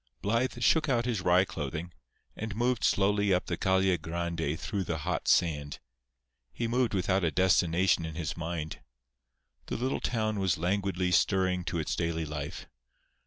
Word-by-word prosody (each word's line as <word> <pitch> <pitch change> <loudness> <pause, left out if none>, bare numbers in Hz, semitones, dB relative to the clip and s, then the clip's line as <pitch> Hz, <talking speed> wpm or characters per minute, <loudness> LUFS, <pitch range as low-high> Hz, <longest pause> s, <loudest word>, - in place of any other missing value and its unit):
Blythe 120 +3 0
shook 160 -2 +3
out 120 -2 +2
his 115 -6 -1
wry 90 +1 +4
clothing, 80 -1 -5 0.4
and 110 -2 -5
moved 120 +1 0
slowly 100 0 +2
up 90 -1 +2
the 85 - -2
Calle 95 +1 +2
Grande 80 -2 -3
through 100 -4 -2
the 85 -2 -2
hot 80 +2 -3
sand. 75 -4 +2 0.7
He 115 - -3
moved 120 -2 +1
without 95 0 +1
a 85 - +3
destination 90 0 +3
in 80 -1 -5
his 85 -2 -3
mind. 80 -2 -4 0.9
The - - -3
little 130 +4 -1
town 110 -3 -1
was 95 -4 +1
languidly 90 +1 0
stirring 90 0 +2
to 85 - -2
its 80 - -1
daily 85 -1 -1
life. 75 -1 -6
90 Hz, 160 wpm, -29 LUFS, 85-100 Hz, 0.9 s, wry